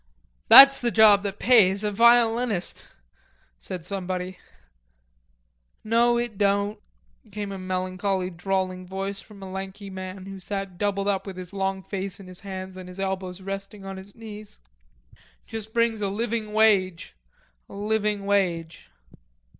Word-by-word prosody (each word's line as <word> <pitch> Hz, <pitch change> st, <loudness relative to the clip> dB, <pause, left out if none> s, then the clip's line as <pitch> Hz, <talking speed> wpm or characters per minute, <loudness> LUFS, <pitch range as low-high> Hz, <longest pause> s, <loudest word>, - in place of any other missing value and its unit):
"That's 275 Hz, 0 st, +10 dB
the 240 Hz, -, +1 dB
job 215 Hz, -3 st, +6 dB
that 200 Hz, -1 st, -4 dB
pays, 205 Hz, -5 st, +4 dB
a 210 Hz, -, 0 dB
violinist," 230 Hz, -2 st, +2 dB, 0.7 s
said 175 Hz, -, -6 dB
somebody. 185 Hz, -1 st, -4 dB, 1.4 s
"No, 235 Hz, +2 st, +3 dB
it 235 Hz, -4 st, -3 dB
don't," 200 Hz, +1 st, +1 dB, 0.5 s
came 205 Hz, 0 st, -5 dB
a 195 Hz, -, -6 dB
melancholy 185 Hz, 0 st, -2 dB
drawling 185 Hz, +1 st, -2 dB
voice 195 Hz, +1 st, -4 dB
from 200 Hz, -3 st, -14 dB
a 190 Hz, -, -8 dB
lanky 195 Hz, +1 st, -7 dB
man 185 Hz, 0 st, -7 dB
who 195 Hz, 0 st, -8 dB
sat 195 Hz, -1 st, -5 dB
doubled 200 Hz, -1 st, -1 dB
up 195 Hz, -1 st, -1 dB
with 190 Hz, -2 st, -7 dB
his 185 Hz, +1 st, -8 dB
long 195 Hz, -1 st, -2 dB
face 195 Hz, 0 st, -5 dB
in 195 Hz, -, -11 dB
his 185 Hz, 0 st, -10 dB
hands 190 Hz, -1 st, -7 dB
and 185 Hz, -1 st, -9 dB
his 180 Hz, +1 st, -11 dB
elbows 190 Hz, -1 st, -3 dB
resting 195 Hz, +1 st, -7 dB
on 195 Hz, 0 st, -6 dB
his 195 Hz, +1 st, -12 dB
knees. 215 Hz, -2 st, -10 dB, 0.9 s
"Just 220 Hz, -1 st, -7 dB
brings 230 Hz, -1 st, +1 dB
a 200 Hz, -, 0 dB
living 220 Hz, +1 st, -3 dB
wage... 200 Hz, -5 st, +2 dB, 0.6 s
a -, -, -11 dB
living 210 Hz, 0 st, -1 dB
wage." 170 Hz, -, -1 dB
195 Hz, 145 wpm, -25 LUFS, 185-210 Hz, 1.4 s, That's